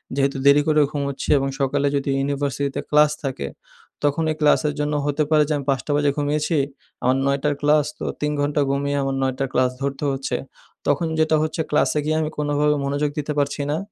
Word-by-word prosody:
যেহেতু 140 0 +1
দেরি 140 +1 +7
করে 155 -1 +4
ঘুমোচ্ছি 140 -2 -3
এবং 135 0 0
সকালে 140 +1 +1
যদি 140 0 -1
ইউনিভার্সিটিতে 140 0 -1
ক্লাস 150 0 +5
থাকে, 130 - -3 0.6
তখনই 155 +2 +1
ক্লাসের 150 0 +3
জন্য 150 0 0
হতে 145 +1 +1
পারে 155 -1 +5
যে - - +2
আমি 140 - -6
৫ঃ০০ 135 +2 0
বাজে 145 -1 +2
ঘুমিয়েছি, 150 +2 0 0.5
আমার 130 +1 +3
৯ঃ০০ 140 +1 +1
র - - -8
ক্লাস। 150 0 +4
তো - - -5 0.2
৩ 150 0 0
ঘণ্টা 145 +1 +1
ঘুমিয়ে 140 +1 -1
আমার 135 0 -1
৯ঃ০০ 130 0 -1
র - - -8
ক্লাস 130 0 +2
ধরতে 140 +1 -3
হচ্ছে। 135 0 -2 0.5
তখন 145 +4 +2
যেটা 155 0 +3
হচ্ছে 155 +1 -2
ক্লাসে 150 0 +2
গিয়ে 155 +1 +1
আমি 155 - -1
কোনোভাবে 150 0 +1
মনোযোগ 145 +1 0
দিতে 150 +1 -2
পারছি 145 0 -1
না। 150 - 0
145 Hz, 195 wpm, -22 LUFS, 140-150 Hz, 0.6 s, দেরি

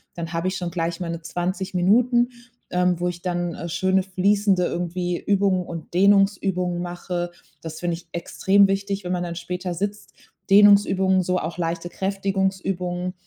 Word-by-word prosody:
dann 170 -1 -5
habe 165 +2 -1
ich 185 - -1
schon 175 -2 -4
gleich 170 -1 -2
meine 170 -1 -4
20 180 +3 -3
Minuten, 240 +7 +3 0.4
ähm, 180 -1 +1
wo 180 - +1
ich 175 0 -7
dann, 175 -1 -2
äh, 170 - -6
schöne, 190 +3 +1
fließende 195 0 +2
irgendwie 175 0 -2
Übungen 195 -2 +1
und 165 -2 -8
Dehnungsübungen 190 -2 +2
mache. 175 0 -4 0.3
Das 160 -1 -7
finde 175 -1 -1
ich 170 - -16
extrem 195 +3 +3
wichtig, 195 +1 -2
wenn 180 - -4
man 180 -1 -1
dann 170 -1 -5
später 180 +1 -4
sitzt. 205 +4 -4 0.4
Dehnungsübungen, 195 -2 +5
so 180 +1 0
auch 165 +2 -5
leichte 170 0 -3
Kräftigungsübungen, 190 -2 -2
180 Hz, 160 wpm, -23 LUFS, 175-195 Hz, 0.4 s, Dehnungsübungen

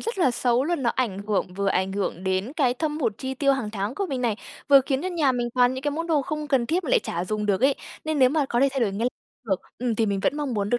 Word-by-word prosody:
rất 455 -3 -4
là 270 -8 +4
xấu 245 +2 +1
luôn. 335 -4 -1
Nó 235 - +2
ảnh 225 -7 -1
hưởng 190 -3 -1
vừa 200 0 0
ảnh 190 0 0
hưởng 195 -2 -3
đến 190 +7 -1
cái 260 -6 +2
thâm 300 +2 -2
hụt 230 -6 +1
chi 265 0 -4
tiêu 275 +1 +3
hàng 240 -6 -2
tháng 205 +2 -3
của 395 +5 -2
mình 265 -5 -3
này, 230 -4 0 0.3
vừa 275 -1 +8
khiến 270 +1 0
cho 370 - -1
nhà 310 -7 +2
mình 240 -1 -1
toàn 250 0 +4
những 260 - -5
cái 290 - 0
món 330 +3 -3
đồ 305 -4 +2
không 300 +2 -4
cần 255 -4 +2
thiết 345 +5 0
mà 260 - -3
lại - - +5
chả 175 +2 -3
dùng 210 +2 -2
được 200 +1 +1
ấy. 270 +1 +4 0.3
Nên 310 -2 -1
nếu 255 -1 +6
mà 295 -1 +1
có 240 - +1
thể 275 - +5
thay 270 -1 -2
đổi 205 -4 +1
ngay 230 +5 0 0.4
được, 190 -2 0 0.2
ừm, 245 -2 0
thì 220 0 +1
mình 200 -1 0
vẫn 290 - +1
mong 285 -5 -2
muốn 205 0 -1
được 245 - +2
250 Hz, 310 wpm, -25 LUFS, 210-285 Hz, 0.4 s, vừa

